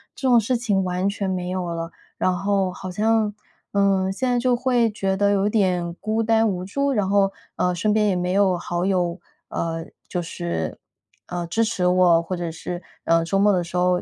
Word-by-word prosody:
这 270 - -2
种 240 -2 +6
事 235 +4 0
情 210 -5 +1
完 180 +1 -1
全 200 -1 -3
没 180 -1 -2
有 185 -1 -2
了， 165 0 -4 0.3
然 185 - +1
后 195 -1 +1
好 185 +1 -7
像， 215 +2 +1 0.4
呃， 195 -2 +2
现 255 +5 -1
在 245 - +2
就 250 0 +2
会 245 -2 +2
觉 195 -2 -1
得 200 0 +3
有 200 0 +2
点 180 -5 +1
孤 220 +4 -1
单 225 0 +3
无 180 -3 -2
助， 280 +9 -1
然 205 -5 0
后， 195 -1 +3 0.2
呃， 180 0 +1
身 210 +5 +1
边 210 0 +3
也 195 - +2
没 180 0 -1
有 190 -2 +3
好 175 0 -2
友， 180 -2 0 0.3
呃， 165 -1 -3 0.2
就 180 - -2
是， 170 - -4 0.5
呃， 175 -1 -3
支 225 +7 +1
持 205 -5 -1
我， 180 -2 +5
或 180 +2 -4
者 175 -1 -3
是， 175 +2 -6 0.2
呃， 165 0 +3
周 195 +4 0
末 205 +1 +5
的 185 -3 +2
时 170 +1 -9
候 180 0 +2
190 Hz, 225 characters per minute, -23 LUFS, 180-210 Hz, 0.5 s, 种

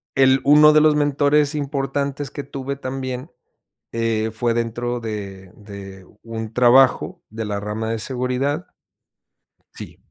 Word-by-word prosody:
el 135 -1 +5
uno 150 +2 +7
de 155 - +6
los 155 -1 +4
mentores 145 0 +2
importantes 140 -1 -2
que 145 - -6
tuve 140 0 -5
también, 130 +1 -5 0.6
eh, 115 -1 -1
fue 120 +1 0
dentro 120 +1 -2
de 100 -4 -7
de 100 -2 -11 0.2
un 115 -1 -6
trabajo 125 +2 +4
de 110 0 -5
la 100 -1 -3
rama 110 +2 -4
de 115 - -2
seguridad. 130 +6 -2 1.1
Sí. - - -10
125 Hz, 130 wpm, -21 LUFS, 110-140 Hz, 1.1 s, uno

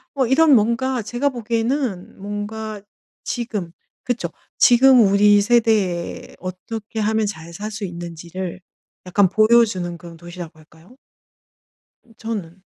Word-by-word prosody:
뭐 265 -3 +1
이런 290 +3 +5
뭔가 235 +3 +1
제가 240 +6 -2
보기에는 235 -4 -2
뭔가 205 +1 -5 0.4
지금 215 -8 -3 0.3
그쵸 245 -1 -2 0.3
지금 255 +1 +6
우리 205 0 +5
세대에 210 -6 +1
어떻게 210 +5 -6
하면 220 +1 +1
잘 170 -5 -6
살 210 +5 -5
수 215 0 -6
있는지를 175 +1 -7 0.4
약간 190 +2 +3
보여주는 215 -5 +3
그런 170 -1 -12
도시라고 175 -1 -9
할까요? 160 +8 -20 1.1
으 230 - -22
저는 195 -5 -6
210 Hz, 255 characters per minute, -21 LUFS, 180-235 Hz, 1.1 s, 지금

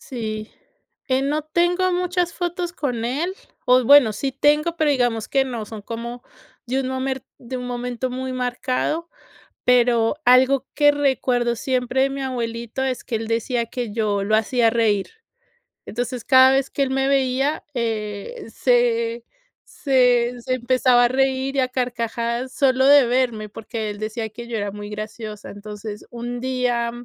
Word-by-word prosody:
Sí, 215 -3 -5 0.6
eh, 260 0 +2
no 295 +2 0
tengo 350 +4 +1
muchas 360 -1 0
fotos 350 0 -3
con 250 -9 -3
él. 300 +10 -1 0.3
O 250 0 +4
bueno, 270 -4 +7
sí 270 +6 -3
tengo, 300 +5 +2
pero 310 -2 +2
digamos 245 -5 0
que 270 -1 +2
no 235 -4 -4
son 215 0 -9
como 235 +3 -6 0.4
de 260 +2 0
un 255 - -3
momer 260 0 -3
de 255 +1 -6
un 250 0 -5
momento 245 +1 -3
muy 260 +1 -4
marcado. 255 +6 -2 0.6
Pero 240 -1 +3
algo 255 +2 +5
que 290 -1 +5
recuerdo 255 -4 +1
siempre 255 +1 0
de 275 - +1
mi 275 0 -5
abuelito 235 -1 -3
es 260 -2 -2
que 240 - -3
él 225 0 -3
decía 230 +1 -1
que 240 -3 -4
yo 205 -3 0
lo 215 +2 +2
hacía 230 +1 +2
reír. 215 -4 +1 0.8
Entonces, 245 +1 -4
cada 260 0 +7
vez 270 0 +1
que - - -3
él 270 - -1
me 265 0 +1
veía, 270 +1 +1
eh, 215 -4 -4
se 235 -1 +1 0.4
se 250 -3 +2
se 255 +2 -1
empezaba 250 0 +3
a - - +5
reír, 265 +1 0
y 275 - +1
a 255 - +2
carcajadas, 240 0 -2
solo 265 -2 +3
de 285 -2 +7
verme, 240 -3 0
porque 220 +1 -5
él 205 0 -7
decía 220 +1 -4
que 235 +2 -10
yo 235 -1 -3
era 205 -1 -2
muy 205 +1 -8
graciosa. 215 0 -7
Entonces, 210 +1 -8
un 240 +1 -5
día 245 -2 0
250 Hz, 165 wpm, -22 LUFS, 230-265 Hz, 0.8 s, bueno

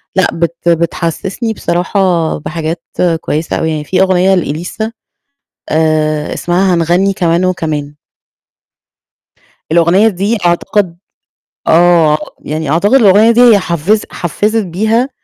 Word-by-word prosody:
لأ، 190 -1 +3
بت 170 +1 -2
بتحسسني 170 +6 -2
بصراحة 175 -3 0
بحاجات 160 +2 -5 0.4
كويسة 155 +2 -2
أوي، 160 - -1
يعني 155 -1 -3
في 185 +5 0
أغنية 190 0 +3
لإليسا 180 +7 -3 0.8
آآ 155 -1 0
اسمها 180 +1 0
هنغني 175 +4 +1
كمان 175 -1 0
وكمان. 155 -5 -2 1.8
الأغنية 170 +6 +4
دي 205 +3 -1
أعتقد 175 +1 0 0.7
آه، 165 -2 +4 0.3
يعني 155 0 -3
أعتقد 175 - +1
الأغنية 220 -3 +5
دي 235 +1 +3
هي 235 -4 +6
حفزِت 180 +4 -1
حفزِت 210 +6 -1
بيها 220 +8 0
175 Hz, 110 wpm, -13 LUFS, 160-195 Hz, 1.8 s, هي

